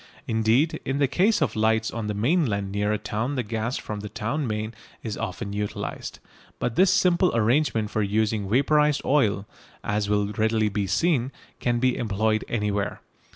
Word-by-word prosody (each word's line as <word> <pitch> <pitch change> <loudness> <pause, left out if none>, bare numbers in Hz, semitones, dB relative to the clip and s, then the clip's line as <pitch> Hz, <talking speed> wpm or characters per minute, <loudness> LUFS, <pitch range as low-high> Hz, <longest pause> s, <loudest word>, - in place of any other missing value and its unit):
Indeed 115 +8 +2
in 135 - -2
the 140 -1 +3
case 185 - +2
of - - -2
lights 110 +1 +2
on 115 -2 -4
the 105 - -2
mainland 110 - +1
near 105 +1 0
a 105 - +1
town 110 +5 -3
the 125 - -1
gas 115 +3 -2
from 105 -1 -5
the 105 0 -6
town 125 +7 -2
main 110 +1 -3 0.3
is 110 -3 -3
often 100 0 -4
utilised. 105 0 -4 0.4
But 120 - -2
this 185 0 +5
simple 185 -1 +3
arrangement 115 -1 +2
for 110 - 0
using 105 0 0
vaporised 150 +4 +3
oil, 105 -8 +2 0.4
as 105 0 -1
will 105 0 +1
readily 110 0 +1
be 100 -1 -2
seen, 135 - +1 0.3
can 120 -1 +1
be 125 +1 +2
employed 110 0 0
anywhere. 105 -3 -1
110 Hz, 170 wpm, -25 LUFS, 105-135 Hz, 0.4 s, this